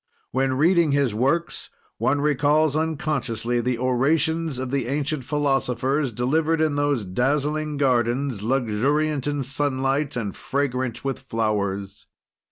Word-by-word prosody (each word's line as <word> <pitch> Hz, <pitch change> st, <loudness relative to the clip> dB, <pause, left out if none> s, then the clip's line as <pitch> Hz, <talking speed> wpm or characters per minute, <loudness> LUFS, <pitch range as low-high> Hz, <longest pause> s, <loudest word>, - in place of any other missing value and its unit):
When 130 Hz, +1 st, +1 dB
reading 160 Hz, +2 st, +3 dB
his 140 Hz, -5 st, +2 dB
works, 140 Hz, +10 st, -1 dB, 0.3 s
one 145 Hz, +1 st, +1 dB
recalls 150 Hz, +1 st, +2 dB
unconsciously 140 Hz, -7 st, -1 dB
the 125 Hz, 0 st, -1 dB
orations 145 Hz, +5 st, +1 dB
of 130 Hz, 0 st, -4 dB
the 135 Hz, -4 st, -1 dB
ancient 145 Hz, +1 st, -2 dB
philosophers, 135 Hz, -1 st, 0 dB
delivered 155 Hz, +8 st, +1 dB
in 155 Hz, -2 st, +1 dB
those 145 Hz, -6 st, 0 dB
dazzling 145 Hz, +8 st, 0 dB
gardens, 125 Hz, -2 st, +1 dB
luxuriant 135 Hz, +5 st, 0 dB
in 145 Hz, -1 st, -1 dB
sunlight 135 Hz, +1 st, -1 dB
and 105 Hz, -5 st, -3 dB
fragrant 130 Hz, -3 st, -2 dB
with 135 Hz, -1 st, -2 dB
flowers. 100 Hz, -5 st, -2 dB
135 Hz, 120 wpm, -23 LUFS, 125-150 Hz, 0.3 s, reading